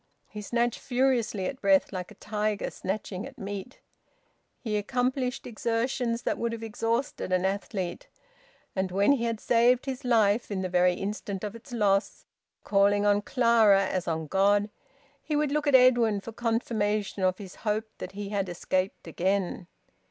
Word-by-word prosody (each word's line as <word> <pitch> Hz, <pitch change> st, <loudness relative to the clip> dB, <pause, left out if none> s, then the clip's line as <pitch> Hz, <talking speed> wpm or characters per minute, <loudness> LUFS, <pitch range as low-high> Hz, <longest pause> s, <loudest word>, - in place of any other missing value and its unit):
He 210 Hz, -, -8 dB
snatched 235 Hz, +2 st, 0 dB
furiously 245 Hz, -6 st, 0 dB
at 260 Hz, +6 st, -4 dB
breath 195 Hz, 0 st, +3 dB
like 180 Hz, -1 st, -4 dB
a 210 Hz, -, -14 dB
tiger 210 Hz, 0 st, -2 dB
snatching 195 Hz, +1 st, -4 dB
at 270 Hz, -, -14 dB
meat. 205 Hz, +4 st, -7 dB, 0.8 s
He 220 Hz, -4 st, -3 dB
accomplished 250 Hz, +4 st, -1 dB
exertions 235 Hz, +1 st, -1 dB
that -, -, -1 dB
would 235 Hz, 0 st, -1 dB
have 225 Hz, -1 st, -6 dB
exhausted 225 Hz, -1 st, -2 dB
an 185 Hz, 0 st, +2 dB
athlete, 190 Hz, -2 st, -3 dB, 0.7 s
and 190 Hz, -1 st, 0 dB
when 200 Hz, +6 st, +3 dB
he 250 Hz, -4 st, +2 dB
had 230 Hz, -2 st, -2 dB
saved 240 Hz, +3 st, +3 dB
his 265 Hz, -2 st, -4 dB
life 225 Hz, -2 st, +2 dB
in 190 Hz, -2 st, -2 dB
the 185 Hz, -, -2 dB
very 180 Hz, 0 st, +3 dB
instant 200 Hz, 0 st, -4 dB
of 210 Hz, +1 st, -4 dB
its 235 Hz, +3 st, -13 dB
loss, 205 Hz, -3 st, +1 dB, 0.4 s
calling 205 Hz, 0 st, +3 dB
on 205 Hz, 0 st, +3 dB
Clara 225 Hz, -5 st, +4 dB
as 185 Hz, -2 st, -2 dB
on 160 Hz, -1 st, -1 dB
God, 205 Hz, +5 st, +2 dB, 0.5 s
he 300 Hz, -, -3 dB
would 295 Hz, -1 st, +1 dB
look 300 Hz, 0 st, 0 dB
at 285 Hz, -, +5 dB
Edwin 240 Hz, -5 st, +5 dB
for 230 Hz, -, -8 dB
confirmation 215 Hz, -3 st, -1 dB
of 185 Hz, 0 st, +2 dB
his 195 Hz, -3 st, -10 dB
hope 215 Hz, 0 st, -1 dB
that -, -, -7 dB
he 205 Hz, 0 st, -5 dB
had 200 Hz, -2 st, -1 dB
escaped 185 Hz, +2 st, -2 dB
again. 185 Hz, +1 st, -1 dB
210 Hz, 165 wpm, -28 LUFS, 195-235 Hz, 0.8 s, at